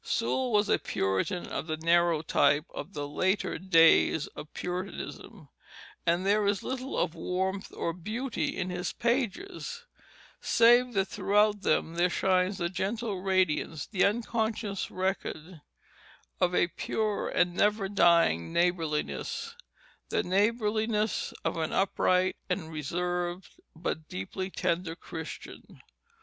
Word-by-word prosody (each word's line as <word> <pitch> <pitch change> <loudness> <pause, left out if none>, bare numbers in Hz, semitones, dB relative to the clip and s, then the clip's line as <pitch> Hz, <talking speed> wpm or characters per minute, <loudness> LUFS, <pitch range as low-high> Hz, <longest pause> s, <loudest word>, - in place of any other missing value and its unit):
Sewall 260 - 0
was 210 -1 +3
a - - +3
Puritan 95 - -1
of - - -4
the 155 -1 -2
narrow 170 0 +3
type 150 0 +3
of 175 +7 -7
the 145 -3 -4
later 190 +7 0
days 165 -4 +5
of 150 - -9
Puritanism; 180 0 -6 0.6
and 175 +3 +2
there 205 +1 +3
is 200 -1 0
little 260 +1 -4
of 170 -2 0
warmth 190 +3 -2
or 170 - -2
beauty 220 +9 -3
in 185 - -2
his 180 0 -3
pages, 275 - -2 0.6
save 240 +2 +5
that 195 -2 +2
throughout 210 +1 +2
them 160 -1 +1
there 175 +2 +2
shines 185 +2 +1
with 175 +1 -2
gentle 205 0 -2
radiance 185 -5 0
the 195 -3 0
unconscious 220 -2 -1
record 185 -3 -3 0.8
of 180 -1 +2
a 175 - +3
pure 215 +3 -2
and 175 0 +2
never 205 +1 +2
dying 170 - +3
neighborliness, 170 - -1 0.5
the - - +1
neighborliness 215 +1 +1
of - - -1
an 160 -1 -1
upright 185 -1 +2
and 165 -3 -2
reserved 175 +4 -3 0.2
but 160 -1 -4
deeply 185 - -4
tender 170 -2 -1
Christian. 160 -2 -9
185 Hz, 125 wpm, -29 LUFS, 170-210 Hz, 0.8 s, days